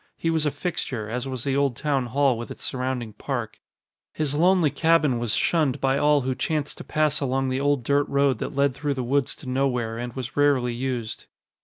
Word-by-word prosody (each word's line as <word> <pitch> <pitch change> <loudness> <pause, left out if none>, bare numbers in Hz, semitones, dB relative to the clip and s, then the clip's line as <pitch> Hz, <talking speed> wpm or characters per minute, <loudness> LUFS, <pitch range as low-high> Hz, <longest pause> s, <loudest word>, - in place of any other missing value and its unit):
He 165 - 0
was 160 -2 +1
a - - +4
fixture, 145 - -3
as 125 +2 -3
was 130 -3 -4
the 135 -1 0
old 140 -3 +1
town 135 -2 0
hall 135 +1 +2
with 115 +1 -6
its - - -8
surrounding 125 -3 -3
park. - - -4 0.5
His 150 -3 -1
lonely 170 0 +3
cabin 160 -6 +3
was 120 -3 -1
shunned 155 -7 +1
by 135 +1 +1
all 150 -1 +4
who 130 0 -1
chanced 150 +3 -2
to - - -6
pass 155 -1 +1
along 135 -1 0
the 130 +1 -1
old 145 -3 +1
dirt 140 +3 +1
road 140 -4 +2
that 145 - -4
led 140 -1 +2
through 145 +1 -2
the 130 - -2
woods 135 +2 0
to - - -14
nowhere 125 -3 -1
and 120 0 -5
was 125 -2 -6
rarely 140 -4 +2
used. 120 -3 -4
135 Hz, 210 wpm, -25 LUFS, 125-145 Hz, 0.5 s, a